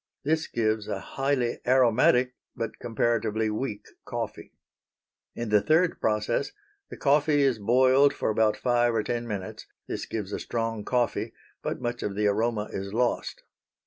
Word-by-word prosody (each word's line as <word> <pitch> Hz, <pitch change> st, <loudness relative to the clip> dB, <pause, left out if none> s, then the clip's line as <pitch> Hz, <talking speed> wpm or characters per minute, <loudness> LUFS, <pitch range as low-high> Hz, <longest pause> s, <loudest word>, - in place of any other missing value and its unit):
This 160 Hz, +2 st, 0 dB
gives 110 Hz, -2 st, -1 dB
a 100 Hz, -, -3 dB
highly 135 Hz, 0 st, -1 dB
aromatic 125 Hz, 0 st, +4 dB, 0.2 s
but 115 Hz, -1 st, -5 dB
comparatively 110 Hz, -2 st, 0 dB
weak 105 Hz, -1 st, -4 dB, 0.2 s
coffee. -, -, -5 dB, 0.8 s
In 120 Hz, -1 st, -4 dB
the 105 Hz, -1 st, +4 dB
third 165 Hz, -, +2 dB
process 105 Hz, -, 0 dB, 0.4 s
the -, -, -8 dB
coffee 145 Hz, 0 st, +3 dB
is 130 Hz, -5 st, +2 dB
boiled 130 Hz, +6 st, +4 dB
for -, -, -1 dB
about 110 Hz, 0 st, +2 dB
five 120 Hz, -1 st, +2 dB
or 110 Hz, -, +1 dB
ten 120 Hz, +2 st, -3 dB
minutes. 100 Hz, -4 st, -6 dB, 0.2 s
This -, -, -4 dB
gives 105 Hz, -2 st, -4 dB
a -, -, -2 dB
strong 115 Hz, -2 st, -3 dB
coffee, 125 Hz, +1 st, -1 dB, 0.3 s
but -, -, -4 dB
much 120 Hz, 0 st, -3 dB
of 100 Hz, -, -3 dB
the 105 Hz, +1 st, 0 dB
aroma 105 Hz, +1 st, 0 dB
is 100 Hz, 0 st, -5 dB
lost. 120 Hz, 0 st, -1 dB
115 Hz, 150 wpm, -27 LUFS, 105-130 Hz, 0.8 s, aromatic